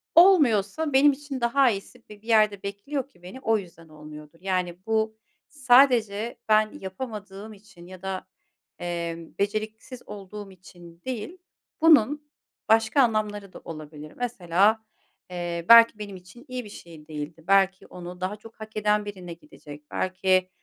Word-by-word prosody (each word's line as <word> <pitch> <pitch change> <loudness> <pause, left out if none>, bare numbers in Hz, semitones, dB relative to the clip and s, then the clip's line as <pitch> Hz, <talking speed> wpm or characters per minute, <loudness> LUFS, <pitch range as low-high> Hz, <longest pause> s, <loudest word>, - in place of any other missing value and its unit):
olmuyorsa 300 - +5
benim 285 +2 +6
için 275 -1 -6
daha 255 +3 +4
iyisi 200 +5 -7
bi 210 -1 -13
bir 225 - -19
yerde 215 -3 +3
bekliyor 255 +8 -4
ki 175 -9 -26
beni, 185 +9 -9
o 225 -3 +2
yüzden 170 -4 -11
olmuyordur. 150 +1 -12
Yani, 185 -2 -1
bu 220 0 0 0.3
sadece 245 -5 +3
ben 215 0 +4
yapamadığım 205 +1 -7
için 195 -4 -16
ya 185 -1 -12
da, 190 -1 -5 0.5
eee, 170 -1 -3 0.2
beceriksiz 215 +4 -3
olduğum 205 0 -9
için 175 -2 -16
değil. 260 - -5 0.4
Bunun 295 -1 +4 0.4
başka 225 +4 +4
anlamları 210 -4 -1
da - - -10
olabilir. 155 -1 -9
Mesela, 215 -2 +2 0.5
eee, 175 -1 -4
belki 230 -2 +8
benim 205 -2 -7
için 185 +8 -15
iyi 255 0 -5
bir - - -10
şey 165 -6 -13
değildi. 155 +1 -7
Belki 195 -1 +3
onu 180 0 -10
daha 190 +3 -2
çok 220 +1 -16
hak 220 0 -8
eden 210 0 +1
birine 185 -4 -7
gidecek. 150 -2 -14
Belki, 185 0 +1
205 Hz, 145 wpm, -25 LUFS, 180-230 Hz, 0.5 s, belki